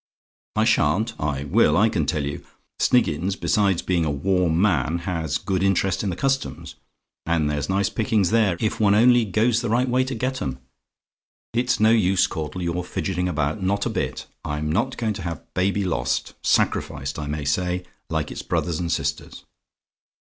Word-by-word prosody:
"I - - +3
SHAN'T? 105 +10 +2
"I 70 -2 -1
will, 75 +2 +3
I 105 +4 +5
can 80 -9 -1
tell 75 0 0
you. 70 0 -5 0.4
Sniggins, 95 -6 +2
besides 100 -4 +1
being 90 -3 +1
a 80 - 0
warm 85 +3 +1
man, 85 -6 +2
has 80 -5 -1
good 95 +3 -2
interest 95 -1 +1
in 100 - -1
the 90 - -3
Customs; 135 +6 -2 0.5
and 85 -3 +1
there's 75 +1 -2
nice 95 +1 +2
pickings 105 -5 +1
there, 105 -7 +3
if 110 - -1
one 100 -2 +4
only 120 +1 +5
goes 110 +4 +2
the 120 - -2
right 120 +3 +2
way 130 +1 +2
to 130 0 -4
get 130 +3 -2
'em. 65 -2 -3 1.0
It's 120 0 +1
no 110 +1 +5
use, 95 -5 +3
Caudle, 80 +2 -4
your 85 +1 -2
fidgetting 90 0 -2
about 75 +2 -1
not 100 +2 0
a - - -1
bit. - - -3 0.2
I'm 75 +1 -2
not 120 +9 0
going 110 -2 -1
to 100 - -7
have 85 -2 -7
baby 100 +3 +1
lost 80 -10 -1
sacrificed, 70 +2 0
I 75 - -4
may 75 0 -3
say, 90 +5 0 0.3
like 80 -2 -2
its - - -5
brothers 85 -3 -1
and 85 -1 -2
sisters. - - -3
90 Hz, 180 wpm, -23 LUFS, 80-110 Hz, 1.0 s, I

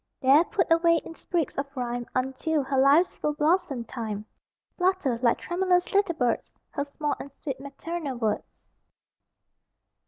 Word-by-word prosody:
There, 275 +4 +6
put 370 0 0
away 335 0 +5
in - - -8
sprigs 330 -3 -2
of 280 - -2
rhyme 245 -1 -3
Until 265 +4 0
her 265 0 0
life's 285 +7 +5
full 300 - -1
blossom 305 -4 +1
time, 220 -3 -5 0.5
Flutter 360 -10 +1
(like 235 -2 +3
tremulous 360 0 0
little 395 -4 +2
birds) 245 -5 -1 0.2
Her 285 -1 -2
small 290 +1 -2
and 280 - -7
sweet 275 -4 -3
maternal 280 0 -5
words. 220 -3 -2
285 Hz, 145 wpm, -27 LUFS, 255-340 Hz, 0.5 s, There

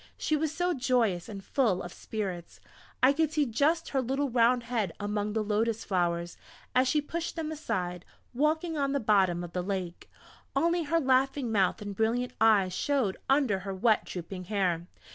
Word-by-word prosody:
She 310 - 0
was 305 0 0
so 355 +2 0
joyous 245 - +1
and 200 -2 -7
full 210 -6 +1
of 175 - -8
spirits! 190 -6 -5 0.4
I 265 +2 +7
could 315 0 +1
see 305 -2 +2
just 295 +8 +1
her 270 - +1
little 270 +2 -1
round 240 +1 +3
head 225 -7 -2
among 205 0 -2
the 220 -1 0
lotus 220 +2 0
flowers, 175 -2 -1 0.4
as 255 +1 +3
she 300 +4 +2
pushed 330 +3 -4
them 320 -2 -3
aside, 180 - -3 0.3
walking 310 +4 0
on 275 -1 0
the 280 - +1
bottom 190 -6 +2
of 170 -1 -8
the 180 - -1
lake; 185 -2 -4 0.5
only 335 +3 +2
her 330 +3 +2
laughing 265 -2 +1
mouth 200 -1 +1
and 205 -1 -6
brilliant 235 +4 0
eyes 205 -5 +4
showed 255 -3 0
under 265 -8 +3
her 195 0 -5
wet 215 +3 +3
drooping 180 +1 -6
hair. 180 -4 0
225 Hz, 180 wpm, -29 LUFS, 190-280 Hz, 0.5 s, I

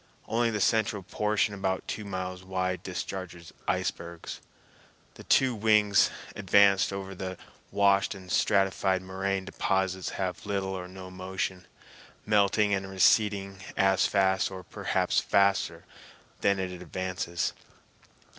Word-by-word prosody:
Only 115 +1 +1
the 105 -2 -2
central 105 -2 +1
portion 105 +2 0
about 95 -1 -2
two 105 - -4
miles 95 -2 -5
wide 95 -1 -2
discharges 90 -2 -6
icebergs. 85 0 -3 0.7
The - - -12
two 130 -2 +3
wings 105 -2 +4 0.3
advanced 100 0 +4
over 95 0 -5
the 95 -1 -5 0.3
washed 100 0 +3
and 95 -1 -10
stratified 95 -1 +2
moraine 95 +1 -2
deposits 95 -1 -1
have 90 -2 -3
little 100 -2 -1
or 90 -1 -5
no 95 0 -10
motion, 95 0 -4 0.6
melting 105 0 +3
and 95 -1 -1
receding 100 0 +2 0.2
as 95 -1 +4
fast, 95 -1 +2
or 95 -1 -8
perhaps - - 0
faster, 95 -4 +1 0.5
than 100 0 +2
it 95 -1 -3
advances. 90 -2 -3
95 Hz, 120 wpm, -28 LUFS, 95-100 Hz, 0.7 s, wings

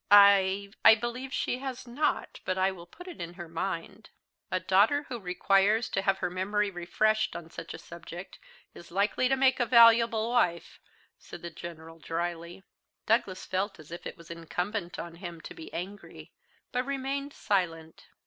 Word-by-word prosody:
"I 200 -1 +6
I - - +10
believe 240 +4 -4
she 250 - -1
has 265 -2 -5
not; 280 +6 -1
but 185 - -1
I 190 +1 +3
will 175 -2 -11
put 355 - -13
her 360 - -7
in 170 - -8
mind." 190 +4 -4 0.4
"A 185 - 0
daughter 210 +12 +3
who 245 -2 -4
requires 195 +4 +2
to 195 - 0
have 195 0 +2
her - - -1
memory 200 +3 0
refreshed 215 +5 +1
on 165 -1 -8
such 165 -1 -7
a - - -7
subject 170 +2 -10 0.3
is 175 - -13
likely 200 +7 +1
to 270 - +4
make 265 0 +3
a 245 - +3
valuable 230 -1 +6
wife!" 175 -9 0 0.4
said - - -11
the 170 - -5
General 165 -1 -9
drily. 170 +2 -4 0.4
Douglas 215 -5 +1
felt 190 0 -2
as 155 0 -14
if 170 - -6
it - - -8
was 170 0 -12
incumbent 180 +3 -4
on 170 0 -7
him 175 -2 -7
to - - -9
be 160 - -10
angry, 195 +4 -8 0.4
but 250 -1 0
remained 275 +1 -3
silent. 165 -8 -2
195 Hz, 170 wpm, -29 LUFS, 170-230 Hz, 0.4 s, I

